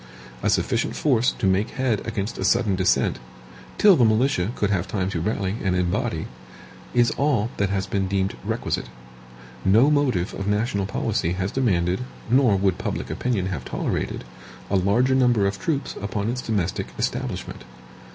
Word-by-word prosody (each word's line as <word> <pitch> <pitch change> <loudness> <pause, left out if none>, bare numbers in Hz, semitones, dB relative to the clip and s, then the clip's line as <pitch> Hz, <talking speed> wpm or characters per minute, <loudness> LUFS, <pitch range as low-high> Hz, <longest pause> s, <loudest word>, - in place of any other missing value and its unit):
A - - +1
sufficient - - 0
force 125 -5 +2
to - - -3
make 95 +3 +2
head 125 -6 +1
against 100 +1 -3
a - - -2
sudden 115 -5 +2
descent, 90 -8 +1 0.6
till 205 -3 +7
the 125 - +3
militia 110 -3 +2
could 105 -1 0
have 95 -2 0
time 95 -1 -2
to 85 - -2
rally 100 +1 -1
and 95 -2 +1
embody, 90 -1 -1 0.7
is 120 -1 +4
all 130 -6 +1
that 100 -1 +1
has 95 -1 -1
been 95 0 -1
deemed 95 0 -1
requisite. - - -2 0.7
No 115 +10 +5
motive 130 -11 +1
of 100 - -4
national 105 -1 0
policy 85 -2 -1
has 95 +2 -2
demanded, 90 -8 +1 0.3
nor 125 -5 +5
would 95 -2 +1
public - - -3
opinion 115 -7 -1
have 80 -9 -4
tolerated, - - -3 0.5
a - - +2
larger 100 +8 +3
number 125 -6 +3
of 100 0 -1
troops 145 -4 -2
upon 100 +2 -2
its 130 +1 -3
domestic 100 -7 -1
establishment. - - -3
100 Hz, 160 wpm, -24 LUFS, 95-120 Hz, 0.7 s, till